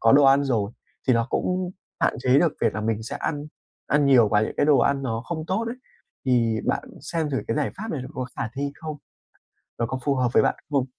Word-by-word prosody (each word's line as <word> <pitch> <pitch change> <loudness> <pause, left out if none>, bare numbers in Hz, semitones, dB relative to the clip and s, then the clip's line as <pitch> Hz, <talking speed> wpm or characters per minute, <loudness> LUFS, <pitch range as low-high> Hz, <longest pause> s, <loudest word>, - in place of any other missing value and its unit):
có 115 - +5
đồ 140 0 +7
ăn 135 +1 +6
rồi, 110 -7 0 0.4
thì 130 - +6
nó 115 0 +2
cũng 180 0 0 0.3
hạn - - +2
chế 130 +1 +4
được 165 -1 +3
việc 115 - +3
mà 110 - -2
mình 110 0 -1
sẽ 110 - -5
ăn 145 -1 -2 0.4
ăn 145 -1 +3
nhiều 120 -6 +6
và 105 0 +3
những - - -2
cái - - +2
đồ 145 -4 +5
ăn 135 +3 +2
nó 115 -4 -2
không 160 -2 -4
tốt 195 +6 0
ấy. 240 - -5 0.5
Thì 115 -3 +2
bạn - - 0 0.2
xem 160 -3 -2
thử 135 - -1
cái - - 0
giải 150 - 0
pháp 220 +3 -5
này 140 - -3
nó 130 - -7
có 130 - -3
khả 110 - -2
thi 140 +1 -2
không? 155 -2 -6 0.8
Nó 115 - +1
có 130 +2 -3
phù 140 - +2
hợp 125 -2 +1
với - - +5
bạn - - +2 0.2
không? 140 -3 +2
135 Hz, 250 wpm, -25 LUFS, 115-150 Hz, 0.8 s, đồ